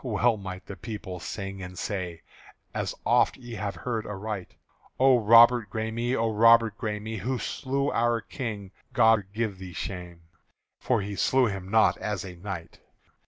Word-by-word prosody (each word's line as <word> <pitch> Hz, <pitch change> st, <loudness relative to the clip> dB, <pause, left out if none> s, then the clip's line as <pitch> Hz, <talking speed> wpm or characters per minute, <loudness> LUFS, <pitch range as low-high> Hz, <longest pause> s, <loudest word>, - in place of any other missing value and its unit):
well 120 Hz, -1 st, +2 dB
might 95 Hz, -3 st, -7 dB
the 100 Hz, -, -7 dB
people 100 Hz, -5 st, -7 dB
sing 95 Hz, +1 st, -6 dB
and 90 Hz, 0 st, -8 dB
say, 90 Hz, -5 st, -4 dB, 0.5 s
As -, -, -2 dB
oft -, -, +3 dB
ye 120 Hz, -2 st, -10 dB
have 100 Hz, -3 st, -3 dB
heard 115 Hz, +4 st, -3 dB
aright: 105 Hz, -1 st, -5 dB, 0.4 s
"O 130 Hz, -1 st, +6 dB
Robert 115 Hz, 0 st, +6 dB
Græme, 115 Hz, +4 st, -2 dB
O 115 Hz, -2 st, +1 dB
Robert 115 Hz, 0 st, +5 dB
Græme, 110 Hz, -1 st, -4 dB
Who 130 Hz, +7 st, -1 dB
slew 140 Hz, +3 st, -2 dB
our 120 Hz, 0 st, +2 dB
King, 105 Hz, -4 st, -6 dB, 0.2 s
God 110 Hz, -3 st, +4 dB
give 105 Hz, -3 st, -2 dB
thee 95 Hz, -2 st, -8 dB
shame!" 90 Hz, -2 st, -6 dB, 0.6 s
For 120 Hz, -4 st, +1 dB
he 100 Hz, 0 st, -5 dB
slew 130 Hz, +5 st, +3 dB
him 95 Hz, -4 st, -4 dB
not 110 Hz, +1 st, +4 dB
as 105 Hz, -3 st, -3 dB
a 90 Hz, -2 st, -8 dB
knight.) 90 Hz, -2 st, -7 dB
105 Hz, 160 wpm, -27 LUFS, 95-115 Hz, 0.6 s, O